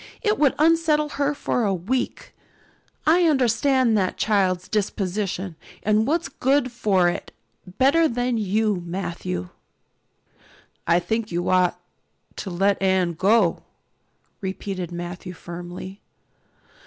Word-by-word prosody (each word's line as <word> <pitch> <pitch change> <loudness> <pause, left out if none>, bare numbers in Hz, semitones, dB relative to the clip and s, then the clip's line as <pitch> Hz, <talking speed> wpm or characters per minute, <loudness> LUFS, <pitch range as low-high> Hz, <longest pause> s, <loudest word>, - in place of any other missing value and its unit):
It 425 0 +1
would 285 -3 +3
unsettle 310 -1 +3
her 290 0 -1
for 245 - -1
a 200 -3 +1
week. 225 +9 -3 0.7
I 340 +3 +5
understand 260 -3 +3
that 185 -1 -1
child's 190 -4 +1
disposition 195 -3 -2 0.3
and 215 +1 +2
what's 330 +2 0
good 270 -1 +1
for 195 -6 +2
it 175 - -3 0.5
better 320 +5 +4
than 245 -2 -1
you, 210 -1 0
Matthew." 170 - -4 1.4
"I 170 +1 +4
think 215 +5 -2
you 175 +1 -2
ought 180 -1 +2 0.6
to 195 - -5
let 195 +3 +1
Anne 190 -2 +2
go," 190 +1 +3 0.8
repeated 190 -2 -4
Matthew 175 +1 -6
firmly. 175 +3 -8
200 Hz, 115 wpm, -23 LUFS, 180-255 Hz, 1.4 s, I